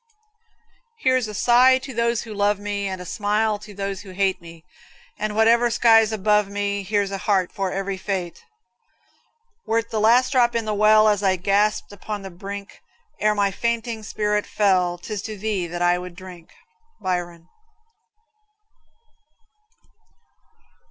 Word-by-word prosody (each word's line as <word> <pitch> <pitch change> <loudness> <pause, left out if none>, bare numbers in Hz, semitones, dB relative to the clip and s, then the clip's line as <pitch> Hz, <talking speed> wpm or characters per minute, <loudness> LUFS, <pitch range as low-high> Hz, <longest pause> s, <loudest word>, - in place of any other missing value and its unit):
Here's 255 - +1
a 210 - -7
sigh 250 +4 +5
to 260 0 -8
those 235 0 0
who 225 -2 -8
love 205 0 +1
me, 205 0 -3
And 190 -1 -5
a 180 - -8
smile 210 +3 0
to 210 0 -12
those 195 -1 -5
who 200 - -12
hate, 190 -1 0 0.8
And 215 0 -2
whatever 230 +2 +4
sky's 225 -1 +4
above 210 -1 +1
me, 200 0 -2
Here's 200 0 -1
a 195 - -4
heart 190 -2 +1
for 195 -2 -3
every 195 0 -3
fate. 185 -3 -4 1.2
Were't 225 0 -1
the 220 - -1
last 240 +4 +4
drop 240 -3 +3
in 230 -1 -1
the 215 - -1
well, 215 +1 +5
As 205 -2 +2
I 190 -2 +2
gasped 200 +4 0
upon 205 +1 -6
the 195 - -8
brink, 200 +3 -9 0.4
Ere 210 0 +2
my 200 -1 +1
fainting 235 +1 -2
spirit 210 -1 -1
fell, 185 -4 +1
'Tis 205 +3 -6
to 215 +1 -7
thee 200 -3 -2
that 175 +1 -4
I 175 0 +3
would 180 -1 -9
drink. 180 -2 -12 0.5
Byron. 175 -2 -4
205 Hz, 150 wpm, -22 LUFS, 190-220 Hz, 1.2 s, sigh